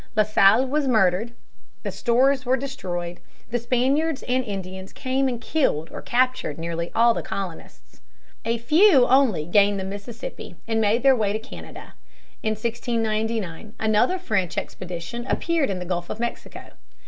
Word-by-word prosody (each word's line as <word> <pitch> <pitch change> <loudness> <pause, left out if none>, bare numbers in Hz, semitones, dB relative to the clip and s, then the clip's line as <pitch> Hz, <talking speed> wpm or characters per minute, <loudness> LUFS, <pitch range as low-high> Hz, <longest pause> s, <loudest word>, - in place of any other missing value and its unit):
La 215 - +5
Salle 215 +3 +5
was 285 +2 0
murdered, 220 -1 +2 0.5
the - - -3
stores 260 +3 +2
were 255 +1 +2
destroyed, 180 -11 -5 0.3
the 240 - 0
Spaniards 265 +6 +1
and 255 +1 0
Indians 190 -3 -6
came 265 0 0
and 245 -3 -2
killed 230 - 0
or - - -7
captured 255 - 0
nearly 170 +1 -3
all 235 +1 +5
the - - -3
colonists. 160 - -7 0.4
A 230 +1 0
few 300 - +5
only 250 - +3
gained 200 +3 +3
the - - -3
Mississippi 205 0 -7
and 225 -1 +1
made 220 +3 +2
their 270 -1 +6
way 210 -4 0
to - - 0
Canada. 220 - -11 0.5
In 215 - 0
1699, 220 -4 -2
another 220 - +2
French 205 - -1
expedition 180 +7 -5
appeared 335 -2 0
in 195 - -2
the 180 - -5
Gulf 175 -1 -3
of 215 - -5
Mexico. 235 0 -5
225 Hz, 155 wpm, -24 LUFS, 190-255 Hz, 0.5 s, their